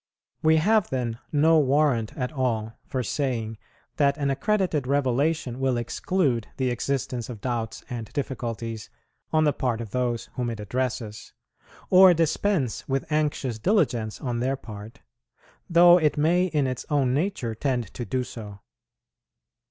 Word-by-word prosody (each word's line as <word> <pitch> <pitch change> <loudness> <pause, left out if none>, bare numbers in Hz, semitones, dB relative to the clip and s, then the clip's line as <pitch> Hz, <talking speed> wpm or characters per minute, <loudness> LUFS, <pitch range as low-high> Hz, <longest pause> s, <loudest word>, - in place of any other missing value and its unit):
We 160 0 +4
have 210 +5 +3
then 120 -3 -2
no 160 +2 +5
warrant 135 -5 +2
at 125 -1 -2
all 115 -6 -1
for 130 -1 -2
saying 115 -3 -2 0.4
that 140 -1 +3
an 140 -2 0
accredited 180 -4 0
revelation 140 0 0
will 130 -2 +1
exclude 120 - 0
the 130 -2 0
existence 125 -1 -2
of 115 -4 -7
doubts 115 -1 -3
and 115 -5 -6
difficulties 115 -5 -4 0.4
on 155 0 +3
the 150 -2 +3
part 120 -3 -1
of 115 -4 -6
those 120 -1 -1
whom 125 -2 -2
it 115 -2 -5
addresses, 115 0 -4 0.6
or 185 -1 +8
dispense 160 - 0
with 135 +3 -2
anxious 145 -6 0
diligence 120 - +1
on 120 -3 -2
their 130 +3 0
part, 110 -3 -10 0.7
though 175 +1 +7
it 150 -2 +1
may 170 +5 +3
in 150 -6 0
its 130 -1 -3
own 140 -4 +2
nature 145 - -1
tend 120 -3 -2
to 120 - -5
do 125 +3 -1
so. 105 -5 -9
130 Hz, 145 wpm, -25 LUFS, 115-150 Hz, 0.7 s, or